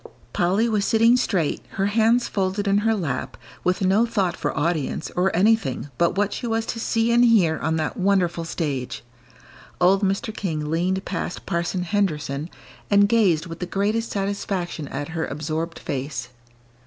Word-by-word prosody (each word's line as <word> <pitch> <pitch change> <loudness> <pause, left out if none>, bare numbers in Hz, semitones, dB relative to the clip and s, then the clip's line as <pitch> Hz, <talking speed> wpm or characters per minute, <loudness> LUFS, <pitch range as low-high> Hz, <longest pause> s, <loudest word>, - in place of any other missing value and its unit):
Polly 190 +6 +2
was 215 -3 +1
sitting 230 +3 +4
straight, 190 - 0
her 195 - 0
hands 225 +4 +3
folded 195 +1 -1
in 200 +1 +3
her 225 +1 +2
lap, 155 -11 -3 0.3
with 180 +2 +1
no 195 +5 +4
thought 200 -6 0
for - - -3
audience, 160 -1 -1
or 180 +2 +3
anything 180 - +1
but 170 +1 +2
what 205 0 +1
she 240 - -4
was 225 0 0
to 230 - -4
see 225 +1 +1
and 240 +1 +5
hear 195 -10 +4
on 160 - 0
that 155 -1 -2
wonderful 185 -3 +1
stage. 145 -6 -3 0.8
Old 190 +3 +4
Mr. 195 +2 -1
King 155 -7 -3
leaned 185 +4 0
past 180 -1 -4
Parson 175 +2 -1
Henderson, 155 -6 -1 0.4
and 200 0 +5
gazed 195 -8 +3
with 165 -1 -8
the 180 - -3
greatest 210 +4 0
satisfaction 195 -5 -3
at 145 +3 -5
her 160 0 -2
absorbed 155 +3 -3
face. 130 -2 -4
185 Hz, 165 wpm, -23 LUFS, 165-210 Hz, 0.8 s, and